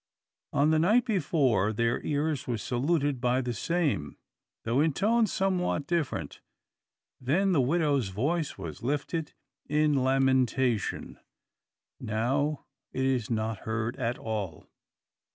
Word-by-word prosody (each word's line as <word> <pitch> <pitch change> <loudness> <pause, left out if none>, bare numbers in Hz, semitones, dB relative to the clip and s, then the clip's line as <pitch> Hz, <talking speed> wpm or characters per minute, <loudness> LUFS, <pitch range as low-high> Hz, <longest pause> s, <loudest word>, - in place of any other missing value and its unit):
On 150 +2 +3
the 160 - +3
night 215 +9 +4
before 140 - +2
their 115 +2 0
ears 145 -2 -1
were 120 -2 -1
saluted 140 +3 0
by 125 0 +2
the 125 -2 -2
same, 140 - -1 0.5
though 120 +5 +1
in 155 -1 +2
tones 220 - +2
somewhat 180 -6 0
different. 170 -3 -2 0.8
Then 170 +10 +1
the 155 -7 +3
widow's 140 - +1
voice 140 - -1
was 85 -6 -7
lifted 150 +4 -2 0.4
in 150 0 +3
lamentation; 130 -3 +1 0.8
now 135 +7 -1 0.3
it 130 - -1
is 130 -4 0
not 110 -2 -1
heard 110 +1 -2
at 120 -2 -1
all. 105 -8 -4
135 Hz, 120 wpm, -28 LUFS, 115-155 Hz, 0.8 s, night